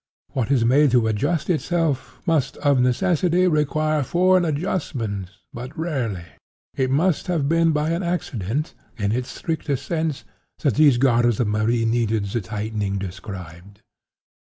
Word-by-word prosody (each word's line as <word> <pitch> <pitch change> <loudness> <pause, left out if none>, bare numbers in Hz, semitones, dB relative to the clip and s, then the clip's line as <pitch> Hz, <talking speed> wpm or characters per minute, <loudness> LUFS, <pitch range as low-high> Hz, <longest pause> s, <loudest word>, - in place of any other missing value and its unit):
What 125 -5 -1
is 125 -5 +3
made 140 +5 +5
to 115 - +2
adjust 145 - 0
itself, 155 -7 -1
must 155 -6 +1
of 140 -2 +2
necessity 175 +7 +2
require 155 -1 +1
foreign 180 +5 +3
adjustment 135 - -2 0.2
but 125 +5 -8
rarely. 130 - -2 0.5
It 130 -1 0
must 155 +5 +1
have 165 -6 0
been 165 +1 +3
by 150 +1 0
an 170 +2 -1
accident, 150 - -2 0.2
in 100 -2 0
its 125 +2 -2
strictest 155 -6 -3
sense, 160 -4 -2 0.4
that 140 - +3
these 145 -4 +5
garters 120 -3 +3
of 115 -4 +1
Marie 110 +2 +1
needed 115 -2 +1
the 105 +4 -2
tightening 105 0 -3
described. 95 -1 -8
135 Hz, 140 wpm, -22 LUFS, 110-160 Hz, 0.5 s, made